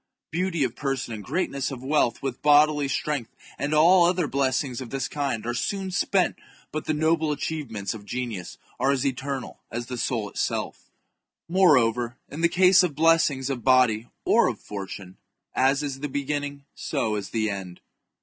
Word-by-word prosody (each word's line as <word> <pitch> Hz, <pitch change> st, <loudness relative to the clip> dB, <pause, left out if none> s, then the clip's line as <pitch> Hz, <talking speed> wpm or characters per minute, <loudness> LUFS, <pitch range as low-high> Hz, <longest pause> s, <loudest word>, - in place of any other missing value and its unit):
Beauty 170 Hz, -2 st, 0 dB
of 125 Hz, -2 st, -2 dB
person 135 Hz, -4 st, -3 dB
and 105 Hz, -2 st, -6 dB
greatness 140 Hz, -, -1 dB
of 130 Hz, -3 st, -7 dB
wealth, 135 Hz, -3 st, +1 dB
with 130 Hz, -3 st, -3 dB
bodily 150 Hz, -1 st, +5 dB
strength, 135 Hz, -2 st, -2 dB, 0.3 s
and 145 Hz, +1 st, -1 dB
all 170 Hz, +4 st, +6 dB
other 175 Hz, 0 st, +2 dB
blessings 130 Hz, -2 st, -1 dB
of 125 Hz, -, -7 dB
this 135 Hz, 0 st, -2 dB
kind, 140 Hz, -7 st, -2 dB
are 120 Hz, -, -1 dB
soon 190 Hz, -, -2 dB
spent, 185 Hz, +1 st, +1 dB, 0.3 s
but 155 Hz, -, -4 dB
the 155 Hz, -, 0 dB
noble 160 Hz, 0 st, +2 dB
achievements 130 Hz, -10 st, -3 dB
of 110 Hz, -2 st, -9 dB
genius 110 Hz, -5 st, -5 dB, 0.2 s
are 135 Hz, -, +2 dB
as 140 Hz, -2 st, +1 dB
eternal 135 Hz, 0 st, -3 dB
as 120 Hz, +1 st, -4 dB
the 125 Hz, 0 st, -5 dB
soul 115 Hz, -5 st, -1 dB
itself -, -, -3 dB, 0.6 s
Moreover, 125 Hz, -10 st, +3 dB
in 150 Hz, -, -6 dB
the 170 Hz, -, +4 dB
case 185 Hz, +1 st, +6 dB
of 175 Hz, -6 st, -1 dB
blessings 155 Hz, -4 st, +3 dB
of 120 Hz, -4 st, -4 dB
body 125 Hz, -4 st, +4 dB, 0.2 s
or -, -, +4 dB
of -, -, -3 dB
fortune, 95 Hz, -2 st, -8 dB, 0.4 s
as 135 Hz, +2 st, +2 dB
is 140 Hz, -2 st, -4 dB
the 145 Hz, +1 st, -4 dB
beginning 145 Hz, 0 st, -3 dB
so 110 Hz, -, -2 dB
is 100 Hz, -2 st, -4 dB
the 110 Hz, -2 st, 0 dB
end. 95 Hz, -3 st, -7 dB
135 Hz, 170 wpm, -25 LUFS, 120-155 Hz, 0.6 s, all